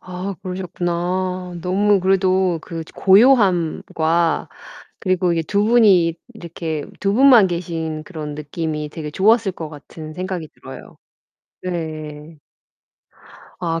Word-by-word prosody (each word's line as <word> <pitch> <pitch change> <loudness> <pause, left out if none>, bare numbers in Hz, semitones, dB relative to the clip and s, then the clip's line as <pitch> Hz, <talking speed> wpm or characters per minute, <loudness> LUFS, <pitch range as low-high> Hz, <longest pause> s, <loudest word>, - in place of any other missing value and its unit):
아 185 +2 -6
그러셨구나. 180 0 -3
너무 200 +3 +2
그래도 185 -1 +2
그 165 0 -6
고요함과 175 -6 +3 0.5
그리고 185 -2 +1
이렇게 165 -2 -1
두 205 0 +1
분이 200 -8 +4 0.2
이렇게 165 -5 -5 0.2
두 200 0 +1
분만 250 -4 +7
계신 165 -3 -4
그런 155 -5 -6
느낌이 150 0 -4
되게 150 -1 -6
좋았을 205 +4 +3
것 160 -4 -7
같은 155 +1 -10
생각이 180 -1 -5
들어요. - - -12 0.7
네. 155 -3 -6 1.2
아 165 -2 -1
175 Hz, 235 characters per minute, -20 LUFS, 160-190 Hz, 1.2 s, 분만